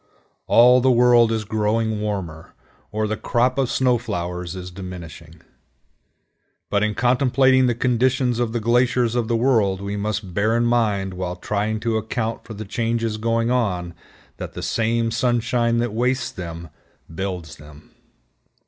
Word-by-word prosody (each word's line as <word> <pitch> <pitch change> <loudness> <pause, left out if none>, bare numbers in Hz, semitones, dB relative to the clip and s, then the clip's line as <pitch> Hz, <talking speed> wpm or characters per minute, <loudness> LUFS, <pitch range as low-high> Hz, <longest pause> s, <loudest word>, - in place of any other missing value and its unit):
All 125 +2 +6
the 130 - +3
world 120 -2 +5
is 110 -1 -2
growing 110 0 0
warmer, 95 -7 -5 0.4
or 110 0 -1
the 110 0 -1
crop 125 +4 0
of 130 -3 +1
snow 125 -2 +2
flowers 90 -5 -4
is 90 0 -7
diminishing. 85 -3 -10 1.3
But 100 - +2
in 105 -1 0
contemplating 130 +1 +3
the 120 - +1
condition 125 0 +1
of 120 -2 -1
the 120 - -1
glaciers 120 +1 +2
of 120 -2 0
the 115 - 0
world, 115 -6 +2
we 100 +1 -4
must 105 -2 -3
bear 110 +5 +1
in 120 - +1
mind 105 -5 +1
while 90 -1 -4
trying 105 +3 -2
to 115 -1 0
account 110 +1 -3
for 110 - -9
the 110 +2 -7
changes 115 +1 -1
going 115 +1 0
on 90 -8 -1 0.4
that - - -7
the - - -7
same 115 0 0
sunshine 120 0 +1
that 120 -2 -1
wastes 125 +3 0
them 85 -2 -7 0.4
builds 90 -3 -5
them. 75 0 -15
110 Hz, 155 wpm, -22 LUFS, 100-120 Hz, 1.3 s, All